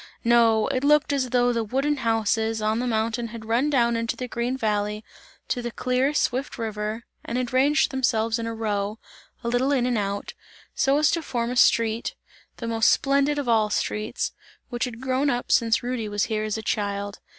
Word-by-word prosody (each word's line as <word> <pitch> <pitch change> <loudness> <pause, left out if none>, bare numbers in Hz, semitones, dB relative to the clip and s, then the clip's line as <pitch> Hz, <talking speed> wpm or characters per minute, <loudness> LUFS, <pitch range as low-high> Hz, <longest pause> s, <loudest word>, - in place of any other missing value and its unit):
No! 230 -2 +4
it 260 -1 -1
looked 295 0 +4
as 260 -3 0
though 245 0 +2
the 230 -1 0
wooden 275 +7 0
houses, 225 -2 0
on 215 +1 0
the 250 - -1
mountain 230 +1 -1
had 230 -1 -9
run 235 +6 +1
down 235 -4 +2
into 230 0 -1
the 250 - -5
green 245 +2 -2
valley, 210 -2 -1 0.4
to 245 - -1
the 240 - -3
clear, 255 +3 0
swift 275 -2 -1
river 220 0 -4 0.2
and 235 - -3
had 250 -1 -2
ranged 285 +4 +3
themselves 230 -4 +1
in 230 - -3
a 230 - -3
row 210 -1 -2 0.5
a - - -3
little 245 +4 +1
in 260 -4 +2
and 245 -3 +1
out 200 0 -3 0.4
so 275 +1 +2
as 300 0 +3
to 335 - 0
form 240 -5 -2
a - - -3
street, 230 -2 +2 0.4
the 235 - -6
most 225 -1 +3
splendid 280 +1 +2
of 285 -3 -2
all 220 -2 +3
streets, 210 0 -2 0.4
which 240 0 -1
had 240 -1 -8
grown 265 +2 +1
up 245 -2 -2
since 230 0 +3
Rudy 240 -3 -3
was 205 0 0
here 215 -1 -1
as 215 0 -2
a 220 - -6
child. 200 -1 -2
235 Hz, 200 wpm, -24 LUFS, 220-255 Hz, 0.5 s, No